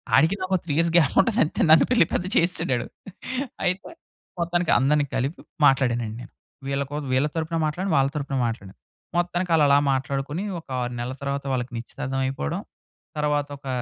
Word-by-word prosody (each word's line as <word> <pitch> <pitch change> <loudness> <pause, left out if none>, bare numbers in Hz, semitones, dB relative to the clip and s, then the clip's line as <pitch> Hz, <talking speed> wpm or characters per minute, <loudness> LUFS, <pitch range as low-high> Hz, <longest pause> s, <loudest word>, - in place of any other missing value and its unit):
ఆడికి 160 +7 +4
నాకు 185 0 0
3 150 - -2
years 165 0 +2
gap 155 -5 +3
ఉంటది 230 +4 0
అంతే - - -3
నన్ను 160 - +7
పెళ్లి 235 -9 +5
పెద్ద 180 - 0
చేసేసాడడు. 165 -8 +1 0.8
అయితే 185 - -1 0.5
మొత్తానికి 175 0 +1
అందరిని 145 +2 +3
కలిపి 135 +6 -2 0.3
మాట్లాడానండి 120 -5 +1
నేను. 120 - -11 0.4
వీళ్ళ 140 0 0
కోసం 145 -2 -4
వీళ్ళ 135 +4 +3
తరపున 165 +1 -1
మాట్లాడిను. 175 +4 -1
వాళ్ళ 135 0 +3
తరపున 140 -2 -2
మాట్లాడాను. 100 -4 -6 0.4
మొత్తానికి 175 0 0
ఆళ్ళలా 145 -2 +5
మాట్లాడుకొని 140 +6 -2 0.2
ఒక 160 - -18
6 120 0 -3
నెలల 125 +2 -3
తర్వాత 140 0 -2
వాళ్ళకి 125 +1 -2
నిశ్చితార్థం 135 +3 -4
అయిపోవడం, 130 - -2 0.6
తర్వాత 145 -1 0
ఒక 135 -1 -12
145 Hz, 160 wpm, -24 LUFS, 135-170 Hz, 0.8 s, నన్ను